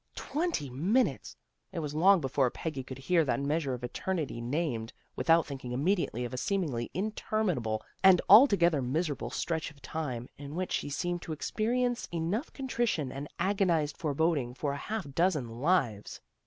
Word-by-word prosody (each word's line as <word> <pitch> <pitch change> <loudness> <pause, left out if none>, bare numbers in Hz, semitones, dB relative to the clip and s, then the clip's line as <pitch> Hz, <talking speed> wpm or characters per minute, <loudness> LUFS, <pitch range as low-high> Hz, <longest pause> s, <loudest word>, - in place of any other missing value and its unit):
Twenty 310 - -2
minutes! 180 - 0 0.3
It 190 - -8
was 150 -3 -3
long 185 +4 +5
before 135 -1 +1
Peggy 155 +1 -4
could 130 0 -8
hear 165 +5 +2
that 140 - 0
measure 140 -1 0
of 125 - -11
eternity 150 0 -3
named, 120 -3 -2 0.2
without 165 0 +4
thinking 130 -3 -6
immediately 140 - 0
of 120 - -6
a - - -3
seemingly 155 - -1
interminable 185 - -1 0.2
and 190 -2 +8
altogether 190 - +7
miserable 135 -2 -1
stretch 160 +5 -2
of 150 -2 -18
tune, 130 -4 -4
in 145 +1 -7
which 185 0 -2
she - - -1
seemed 175 +4 -2
to 160 - -5
experience 240 +9 -1
enough 175 - -2
contrition 235 - -1
and 140 +2 -6
agonized 175 -6 +1
forboding 150 -5 0
for 140 0 -2
a - - -4
half 210 +4 -4
dozen 165 -6 +1
lives. 120 - 0
155 Hz, 155 wpm, -30 LUFS, 135-185 Hz, 0.3 s, and